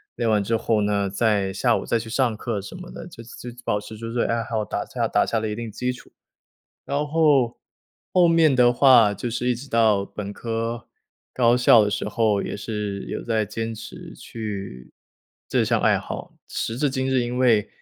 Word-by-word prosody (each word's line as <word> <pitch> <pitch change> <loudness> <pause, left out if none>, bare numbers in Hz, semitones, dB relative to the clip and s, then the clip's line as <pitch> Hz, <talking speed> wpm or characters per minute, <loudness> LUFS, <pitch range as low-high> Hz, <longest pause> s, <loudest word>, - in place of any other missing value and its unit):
练 115 - 0
完 105 -1 +3
之 115 +3 0
后 110 -1 +1
呢， 100 -1 0
在 100 -1 +1
下 115 +5 +2
午 - - -3
再 115 - +1
去 110 0 -8
上 120 -3 0
课 110 -5 -3
什 100 - -9
么 180 -1 -10
的， - - -9
就 115 - -12
就 120 +1 -9 0.2
保 105 -3 0
持 110 +1 -10
住 115 +1 -6
自 120 - -1
己 - - +1
爱 115 0 0
好， 115 -2 -2
打 105 - -4
下 - - -2
打 - - +2
下 115 - 0
了 110 - -2
一 105 - -3
定 115 0 -5
基 125 +4 -2
础。 125 - -12 0.8
然 145 +1 -1
后， 145 -6 +2 0.6
后 180 -1 +6
面 165 -5 +4
的 120 -1 +5
话 120 -5 +6
就 110 +5 -4
是 120 +2 -2
一 125 - +2
直 130 +4 -9
到 110 -4 +3
本 100 -1 -6
科 115 +1 -4 0.5
高 120 -1 +4
校 120 -3 +6
的 105 - -1
时 105 - -2
候， 105 -2 +1
也 - - -4
是 105 -1 -4
有 - - -5
在 110 -2 0
坚 115 +2 -4
持 110 - -10
去 100 - -7 0.6
这 - - +2
项 - - +1
爱 - - +4
好。 - - -7 0.2
时 115 - -3
至 145 - +2
今 130 0 -2
日， 130 -1 +2
因 120 +1 -3
为， 115 -5 +3
115 Hz, 230 characters per minute, -23 LUFS, 105-125 Hz, 0.8 s, 后